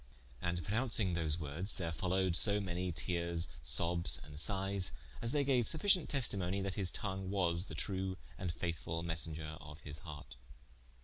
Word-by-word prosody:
And 85 0 -1
pronouncing 110 - +2
those 80 -2 +1
words, 80 +6 -1
there 85 -3 -1
followed 90 +1 +1
so 100 +3 +3
many 90 -2 -1
teares, 85 0 -1
sobbes 85 +6 +2
and 75 -1 -10
sighes, 95 +1 +1 0.3
as 115 - -1
they 145 0 +3
gaue 130 -3 +4
sufficient 170 - +3
testimony, 100 -8 +2
that 95 -1 -1
his 95 -2 +3
tongue 95 +1 -2
was 90 -2 +2
the - - -6
true 95 -1 -1 0.2
and 90 -2 -2
faithfull 85 -1 -3
messenger 80 -1 -3
of 80 0 -10
his 75 +1 -7
hart. 75 -5 -9
90 Hz, 160 wpm, -36 LUFS, 80-100 Hz, 0.3 s, gaue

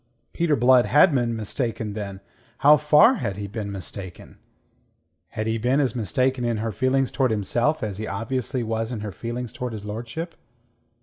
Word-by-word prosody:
Peter 165 -3 +2
Blood 125 0 +5
had 150 +3 +5
been 120 -3 +1
mistaken, 110 -1 -3
then. 100 -2 -6 0.4
How 150 +1 +9
far 150 - +5
had 100 -1 -3
he 105 - -4
been 100 0 -5
mistaken? 95 -1 -8 0.9
Had 110 - -4
he 110 0 -1
been 125 +5 +2
as 130 -6 +1
mistaken 125 +2 0
in 120 -2 0
her 110 +1 -2
feelings 130 +3 +1
towards 130 -3 +1
himself 120 +9 0
as 105 -2 -4
he 110 - -4
obviously 120 +5 -2
was 115 +1 -2
in 115 -4 -4
her 105 -1 -5
feelings 120 +2 -5
towards 125 -2 -5
his 105 -2 -7
lordship? 120 +11 -5
115 Hz, 175 wpm, -24 LUFS, 105-130 Hz, 0.9 s, How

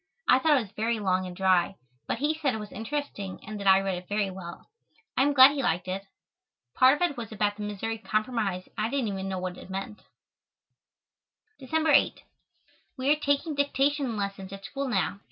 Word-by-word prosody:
I 255 - +6
thought 295 +2 +4
it - - +2
was 205 -4 -9
very 225 +1 -1
long 185 -2 0
and 180 - -8
dry, 185 0 +2 0.3
but - - -1
he 295 +5 +1
said 295 -6 -1
it - - -4
was 210 -1 -8
interesting 225 -4 -4
and 215 0 -6
that 200 - -3
I 190 0 +7
read 190 -2 -2
it 180 - -17
very 205 -1 0
well. 175 -2 -9 0.5
I - - +2
am 285 +2 +4
glad 265 0 +9
he 285 -1 -2
liked 180 -6 0
it. 195 +2 -4 0.7
Part 260 +3 +5
of - - +1
it 290 - -9
was 230 -3 -6
about 205 -1 0
the 210 - -9
Missouri 210 +2 -3
Compromise 215 -4 -1
and - - -27
I 220 - 0
didn't 255 -4 -1
even 195 -1 -4
know 190 - -2
what 180 0 -4
it - - -12
meant. 195 +2 -5 1.6
December 315 +4 +1
8. - - +3 0.7
We 260 +2 +1
are - - +6
taking 285 +2 0
dictation 280 -3 0
lessons 195 -1 -4
at 195 0 -9
school 275 +3 -4
now. 200 -3 0
215 Hz, 210 wpm, -27 LUFS, 195-270 Hz, 1.6 s, glad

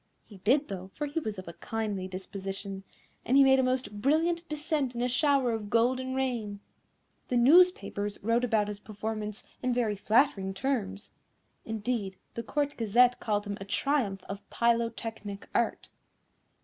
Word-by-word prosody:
He 205 - -14
did, 265 +10 +2
though, 190 -1 -6
for 295 - -2
he 290 +3 -2
was 215 -9 -4
of 185 - -8
a 170 - -7
kindly 210 -3 -3
disposition, 195 +1 -6 0.4
and 260 - +3
he 280 - +8
made 265 0 +6
a - - +3
most 255 -5 -1
brilliant 335 +5 +1
descent 300 -4 -1
in 235 - -2
a - - +2
shower 270 -1 +2
of 220 -2 -3
golden 255 +3 +1
rain. 235 -6 -2 0.7
The 250 - +1
newspapers 250 - +4
wrote 230 +3 +2
about 220 -4 +2
his 205 -1 -5
performance 215 0 -5 0.2
in 250 -1 0
very 225 -4 +1
flattering 205 -3 +2
terms. 205 -5 -2 0.5
Indeed, 220 -3 -2 0.2
the 235 - -3
Court 290 +4 -1
Gazette 245 +3 +4
called 205 -1 -1
him 200 0 -5
a - - -5
triumph 205 -4 0
of 195 0 -6
Pylotechnic 230 -3 -1
art." - - 0
230 Hz, 160 wpm, -29 LUFS, 205-260 Hz, 0.7 s, he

